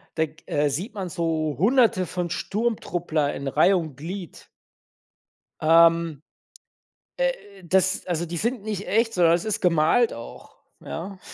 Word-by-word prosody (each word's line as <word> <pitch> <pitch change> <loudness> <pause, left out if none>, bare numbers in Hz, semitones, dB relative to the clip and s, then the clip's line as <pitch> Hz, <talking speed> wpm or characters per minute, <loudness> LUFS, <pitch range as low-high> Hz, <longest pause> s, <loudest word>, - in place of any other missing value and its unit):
da 160 - +2
g 155 0 -17
äh, 145 0 +1
sieht 180 - -4
man 195 -3 -4
so 160 -4 -1
Hunderte 220 - +3
von 175 0 -3
Sturmtruppler 175 -9 -1
in 140 - -5
Reih 155 +8 +4
und 160 -6 -3
Glied. 175 +5 -8 1.1
Ähm, 165 -1 +4 0.9
äh, - - +2 0.3
das 190 +3 +1
also, 170 -1 -2
die 170 +1 -5
sind 235 +2 -2
nicht 210 -2 -4
echt, 225 +2 +1
sondern 170 -2 +4
das 170 0 +1
ist 215 -2 -2
gemalt 175 +7 +3
auch, 115 0 -11 0.2
ja? 185 +3 -7
175 Hz, 145 wpm, -24 LUFS, 160-200 Hz, 1.1 s, Reih